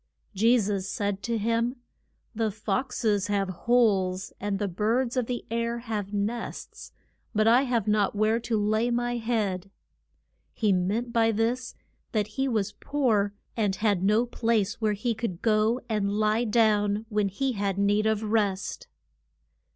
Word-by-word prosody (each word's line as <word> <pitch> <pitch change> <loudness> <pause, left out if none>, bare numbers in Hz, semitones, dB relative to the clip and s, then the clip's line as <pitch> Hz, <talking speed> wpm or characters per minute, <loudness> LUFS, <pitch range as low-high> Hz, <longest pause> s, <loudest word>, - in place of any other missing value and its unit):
Je 230 +5 +4
sus 200 -3 -1
said 200 -3 -2
to 230 +3 -1
him, 230 +3 0 0.6
The 225 -1 0
fox 225 +5 -3
es 205 -3 +2
have 200 -2 0
holes, 190 -2 +1
and 205 0 -2
the 205 0 -1
birds 230 +7 0
of 250 -3 0
the 245 -1 -4
air 235 0 -1
have 215 -4 -4
nests, 210 +3 -4 0.4
but 215 +1 +3
I 240 +3 +6
have 235 -5 0
not 210 -1 +2
where 215 +2 +2
to 230 -1 -1
lay 215 +3 +1
my 240 0 0
head. 210 -5 -1 0.8
He 210 -3 +2
meant 210 +7 -1
by 225 -1 +3
this 235 +3 -1 0.4
that 210 -2 0
he 265 +6 -1
was 215 -6 0
poor, 220 -8 0 0.2
and 205 -4 0
had 205 -2 +1
no 210 +5 +3
place 225 -3 0
where 215 -1 +2
he 230 +4 -1
could 220 -6 -4
go 220 +2 +2
and 210 -3 0
lie 215 +3 +1
down 210 -1 +2
when 210 -2 +1
he 260 +8 -1
had 200 -4 -2
need 205 +2 +2
of 220 0 0
rest. 205 -3 -1
215 Hz, 160 wpm, -27 LUFS, 205-235 Hz, 0.8 s, I